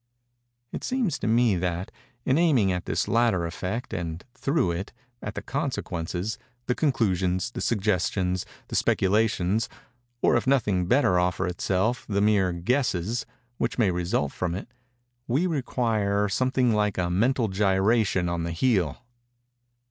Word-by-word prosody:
It - - -5
seems 250 -8 0
to - - -2
me 115 -2 +3
that, 90 +1 -2 0.3
in 130 +4 +3
aiming 135 - +3
at 90 -1 -2
this - - -1
latter 115 -7 +2
effect, 95 +8 -4
and, 85 -1 -4
through 140 - 0
it, 90 +4 -4 0.3
at 105 - -5
the - - -5
consequences—the 120 - -3
conclusions—the 95 - 0
suggestions—the 95 -3 -1
speculations—or, 115 +4 0
if 120 - 0
nothing 105 -10 +2
better 105 -7 +3
offer 90 0 0
itself 95 +6 -1
the 100 -1 +1
mere 100 -3 +3
guesses 110 +2 -1 0.3
which - - -1
may 110 -6 +3
result 85 -5 -1
from 90 -2 -2
it—we 120 - -5
require 115 - 0
something 130 +3 +1
like 105 -2 +1
a 90 -1 0
mental 115 +6 +2
gyration 95 0 +2
on 85 -1 -1
the 85 0 -3
heel. 100 - 0
105 Hz, 125 wpm, -26 LUFS, 90-120 Hz, 0.3 s, me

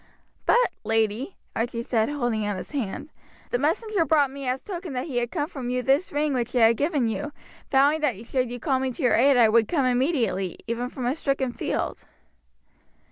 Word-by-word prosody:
"But, - - +4
lady," 225 - 0 0.2
Archie 235 0 -2
said, 225 -1 +1
holding 240 -7 -1
out 205 -2 -2
his - - -8
hand, 285 +1 -4 0.4
"the 245 - +1
messenger 355 - +1
brought 300 -4 +3
me 275 -1 -6
as 255 +1 -1
token 355 -5 -6
that 250 0 -2
he 275 -7 -4
had 240 -1 0
come 295 -1 -2
from 265 -7 -6
you 250 0 -1
this 275 +7 +2
ring 295 0 0
which 245 -1 -2
I 225 -2 +6
had 230 - +1
given 290 -5 +1
you, 295 +7 -3 0.4
vowing 285 +3 +4
that 235 -7 -1
should 255 0 -1
you 245 0 -6
call 265 -2 +1
me 260 0 -1
to 290 - -6
your 250 - +4
aid 270 +2 +5
I 235 -2 +7
would 220 0 +4
come 280 -2 +1
immediately, 245 - 0
even 235 +2 -2
from 255 -1 -5
a 245 - +2
stricken 275 -4 -1
field." - - -3
255 Hz, 205 wpm, -25 LUFS, 235-290 Hz, 0.4 s, I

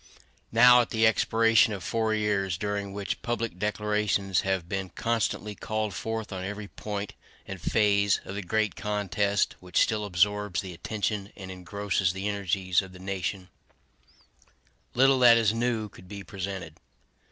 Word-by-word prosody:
Now, 125 +2 +7
at 120 - -3
the 110 0 +2
expiration 115 0 +4
of 95 -3 -6
four 115 -1 0
years, 100 -4 0
during 100 0 -3
which 100 0 -4
public 115 -6 -3
declarations 105 -2 0
have 95 -3 -1
been 95 -1 -3
constantly 115 -2 -1
called 110 0 -3
forth 110 -2 -4
on 95 -1 -4
every 105 +2 -5
point 105 -1 -5 0.3
and 95 -3 -7
phase 100 -2 +2
of - - -6
the 100 - -3
great 105 +3 0
contest 105 -1 0
which 90 0 -5
still 110 -1 -1
absorbs 105 0 +1
the 95 -3 -8
attention 105 +2 -3
and 95 -1 -8
engrosses 95 0 -1
the 95 +2 -3
energies 95 -2 0
of 95 -1 -11
the - - -11
nation, 95 0 -4 1.5
little 135 +1 +5
that 120 -2 +8
is 110 -2 +3
new 115 -2 -1
could 90 -2 -16
be 100 +1 -8
presented. 95 -5 -6
100 Hz, 150 wpm, -27 LUFS, 95-110 Hz, 1.5 s, that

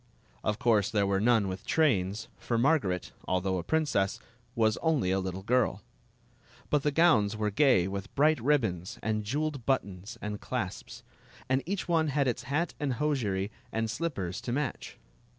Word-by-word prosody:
Of 105 - 0
course 110 -5 +3
there 100 -2 +1
were 100 0 +1
none 115 -3 +3
with 95 0 -5
trains, 105 - +1
for 120 - -1
Margaret, 115 - +1
although 95 0 0
a - - -4
prin 160 - +1
cess, 100 -9 0 0.4
was 110 -1 +2
only 150 - +1
a 95 - +2
little 95 0 -4
girl; 115 -3 +1 0.9
but 150 - +3
the 150 - +1
gowns 135 -10 +3
were 105 -1 0
gay 130 -7 +4
with 100 0 -6
bright 150 -2 +3
ribbons 110 -11 0
and 110 -1 0
jeweled 145 +4 -2
buttons 100 -3 -1
and 105 -1 -5
clasps; - - -5 0.4
and 130 +1 +2
each 195 0 -2
one 165 -2 +2
had 140 -1 +1
its 120 - -1
hat 160 +5 0
and 140 -3 0
hosiery 115 -9 -1 0.2
and 110 0 -1
slippers 110 - -3
to 120 - -4
match. 135 0 -3
115 Hz, 170 wpm, -29 LUFS, 100-145 Hz, 0.9 s, gay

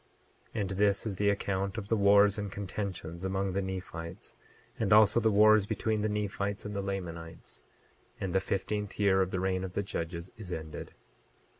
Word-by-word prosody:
28:9 110 - 0
And 95 - -2
this 100 0 +3
is 100 -4 -3
the 100 +1 +3
account 100 0 -1
of 100 -3 -4
the 115 - +3
wars 100 0 +5
and 100 -2 -4
contentions 95 -4 -5
among 95 0 -1
the 100 - 0
Nephites, 90 -3 -6 0.4
and 110 -3 0
also 105 +1 +7
the 110 -1 +3
wars 105 0 +6
between 110 0 -1
the 110 - 0
Nephites 100 -1 -2
and 105 0 -5
the 100 - -1
Lamanites; 85 -4 -6 0.6
and 95 -2 -3
the 95 - +4
fifteenth 105 +2 -3
year 95 -2 +4
of 95 - +1
the 95 - -2
reign 95 0 0
of 95 -1 -5
the 100 - -1
judges 85 -1 -5
is 100 -5 -7
ended. 80 -2 -6
100 Hz, 185 wpm, -30 LUFS, 95-105 Hz, 0.6 s, also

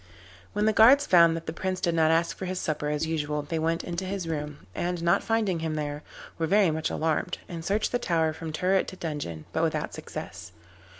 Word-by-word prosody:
When 210 +1 +1
the 220 - +3
guards 260 +7 +7
found 170 - +5
that 165 - -8
the 160 - -4
Prince 185 +2 -2
did 170 -2 0
not 160 -1 +3
ask 165 +1 +2
for 190 - -6
his 185 0 -3
supper 150 -3 -2
as 150 +1 0
usual, 150 -2 -2
they 160 +2 -3
went 165 +1 0
into 175 +1 -4
his 190 -2 -3
room, 150 - -5
and 175 -1 -2
not 170 0 +3
finding 215 -6 0
him 160 -1 -2
there, 145 -1 -3 0.4
were 165 - +1
very 195 -1 +4
much 160 0 -1
alarmed, 160 -1 -1
and 170 -2 -6
searched 205 +5 0
the 245 - +1
tower 165 -7 +1
from 160 0 -6
turret 185 +5 +1
to - - -7
dungeon, 145 - -5
but - - 0
without - - -1
success. - - -8
165 Hz, 220 wpm, -27 LUFS, 155-185 Hz, 0.4 s, guards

